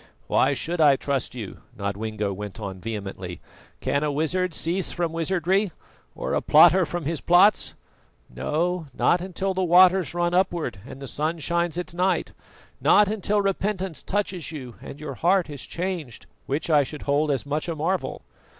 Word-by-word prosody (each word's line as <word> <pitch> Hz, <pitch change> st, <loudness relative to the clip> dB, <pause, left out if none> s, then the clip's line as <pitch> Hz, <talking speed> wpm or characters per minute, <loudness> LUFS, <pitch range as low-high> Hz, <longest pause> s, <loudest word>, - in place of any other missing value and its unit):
"Why -, -, +2 dB
should 170 Hz, 0 st, -2 dB
I 145 Hz, -3 st, +7 dB
trust 135 Hz, -1 st, -2 dB
you?" 110 Hz, -6 st, -7 dB, 0.2 s
Nodwengo 100 Hz, 0 st, -3 dB
went 105 Hz, +2 st, -7 dB
on 95 Hz, -3 st, -6 dB
vehemently. 100 Hz, -4 st, -6 dB, 0.4 s
"Can 140 Hz, +1 st, 0 dB
a 150 Hz, -, 0 dB
wizard 170 Hz, +5 st, 0 dB
cease 170 Hz, +4 st, -1 dB
from 170 Hz, -2 st, -2 dB
wizardry, 185 Hz, +3 st, +1 dB, 0.4 s
or -, -, -3 dB
a -, -, +1 dB
plotter 185 Hz, -2 st, +6 dB
from 175 Hz, 0 st, -4 dB
his 160 Hz, +1 st, -2 dB
plots? 180 Hz, +4 st, +4 dB, 0.5 s
No, 160 Hz, -, -2 dB
not 175 Hz, -, +3 dB
until 190 Hz, +1 st, -2 dB
the 190 Hz, 0 st, 0 dB
waters 180 Hz, -2 st, +5 dB
run 175 Hz, 0 st, +1 dB
upward 170 Hz, -, 0 dB
and 135 Hz, -, -9 dB
the -, -, -6 dB
sun 155 Hz, +5 st, -2 dB
shines 170 Hz, +2 st, -1 dB
at 180 Hz, -2 st, -4 dB
night; 180 Hz, +2 st, 0 dB, 0.5 s
not 205 Hz, -1 st, +5 dB
until 205 Hz, -1 st, 0 dB
repentance 195 Hz, -3 st, -2 dB
touches 190 Hz, -5 st, -2 dB
you 130 Hz, -6 st, -7 dB
and 140 Hz, -, -9 dB
your 150 Hz, -, -5 dB
heart 180 Hz, -1 st, +2 dB
is 145 Hz, -, -7 dB
changed, 170 Hz, -9 st, -4 dB, 0.2 s
which 140 Hz, +4 st, -2 dB
I 150 Hz, -2 st, +6 dB
should 145 Hz, +2 st, -6 dB
hold 145 Hz, +2 st, +1 dB
as 135 Hz, -3 st, 0 dB
much 150 Hz, +4 st, -2 dB
a 165 Hz, -, -2 dB
marvel. 165 Hz, -, -2 dB
165 Hz, 170 wpm, -25 LUFS, 140-180 Hz, 0.5 s, I